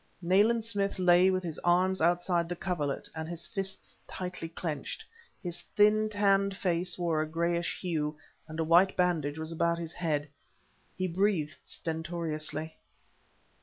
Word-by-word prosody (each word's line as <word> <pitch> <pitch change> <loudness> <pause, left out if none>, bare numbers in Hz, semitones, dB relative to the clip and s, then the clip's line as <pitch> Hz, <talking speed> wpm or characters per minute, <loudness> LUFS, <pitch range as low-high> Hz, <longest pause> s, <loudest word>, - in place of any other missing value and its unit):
Nayland 205 +6 +3
Smith 200 -3 0
lay 180 0 +5
with 185 0 0
his 165 -3 -5
arms 185 +1 +2
outside 175 0 +2
the 175 - -2
coverlet 165 -6 -2
and 160 0 -5
his 170 -1 -4
fists 195 -3 -4
tightly 180 -3 -5
clenched. 160 -3 -4 0.4
His 175 -2 -3
thin, 215 +1 +5
tanned 200 -1 +2
face 175 -1 0
wore 170 -3 +1
a 155 - -1
grayish 170 +2 -1
hue, 155 -4 -2 0.3
and 155 0 -7
a - - +2
white 175 +4 +5
bandage 160 -5 +1
was 160 0 -4
about 170 +1 +1
his 170 -1 -5
head. 155 -4 -1 0.7
He 185 0 0
breathed 175 -4 0
stentoriously. 160 -1 -4
175 Hz, 145 wpm, -30 LUFS, 160-185 Hz, 0.7 s, lay